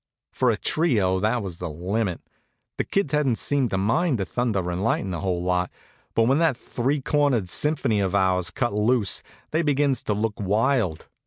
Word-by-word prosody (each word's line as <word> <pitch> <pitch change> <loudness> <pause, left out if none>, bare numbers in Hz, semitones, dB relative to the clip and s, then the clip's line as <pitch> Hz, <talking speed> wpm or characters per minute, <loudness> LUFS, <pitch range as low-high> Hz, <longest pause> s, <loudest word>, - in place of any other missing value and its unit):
For 125 - +1
a 110 - +1
trio 105 - +1
that 110 +3 0
was 90 -4 -7
the 90 - -4
limit. 90 +4 -2 0.6
The - - +2
kids 195 -8 -1
hadn't 140 -6 +2
seemed 140 -4 +1
to 95 - -1
mind 130 - +1
the 95 - -2
thunder 100 -5 -1
and 90 +2 -3
lightnin' 100 -4 0
a 85 - -3
whole 90 -3 -1
lot, 90 0 0 0.5
but 115 - +4
when 135 +6 +3
that 160 -7 +2
three 135 +5 -2
cornered 135 -8 +1
symphony 140 - +1
of 95 0 0
ours 90 -2 +2
cut 120 +2 -2
loose 105 0 +1 0.3
they 160 - +1
begins 140 -4 +1
to 105 - 0
look 105 0 -2
wild. 105 - 0
110 Hz, 185 wpm, -24 LUFS, 95-135 Hz, 0.6 s, but